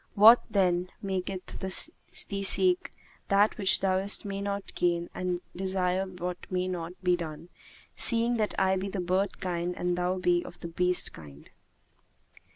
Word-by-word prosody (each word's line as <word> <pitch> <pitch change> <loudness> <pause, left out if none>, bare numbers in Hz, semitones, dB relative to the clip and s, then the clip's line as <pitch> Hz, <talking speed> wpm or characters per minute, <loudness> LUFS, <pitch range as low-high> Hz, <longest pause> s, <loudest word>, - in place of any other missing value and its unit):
What, 225 +4 +8
then, 180 -2 +1
maketh 190 -1 -4
thee 195 - -2
seek 360 - +3 0.4
that 200 +1 +3
which 195 -2 +5
thou 190 -1 +2
mayst 200 +2 0
not 200 0 -4
gain 175 -1 -1
and 180 -1 -3
desire 190 0 -1
what 180 -1 -5
may 185 0 -1
not 175 -2 -4
be 180 -1 +3
done, 165 0 -7 0.5
seeing 235 0 +3
that 215 -1 -1
I 190 0 +2
be 190 +1 -3
of 195 - -8
the 200 - -2
bird 185 +2 -1
kind 175 -1 -3
and 180 0 -1
thou 180 +1 -1
be 175 -1 +1
of - - -12
the 170 - -6
beast 180 +1 +2
kind? 75 -2 -14
185 Hz, 160 wpm, -28 LUFS, 180-195 Hz, 0.5 s, What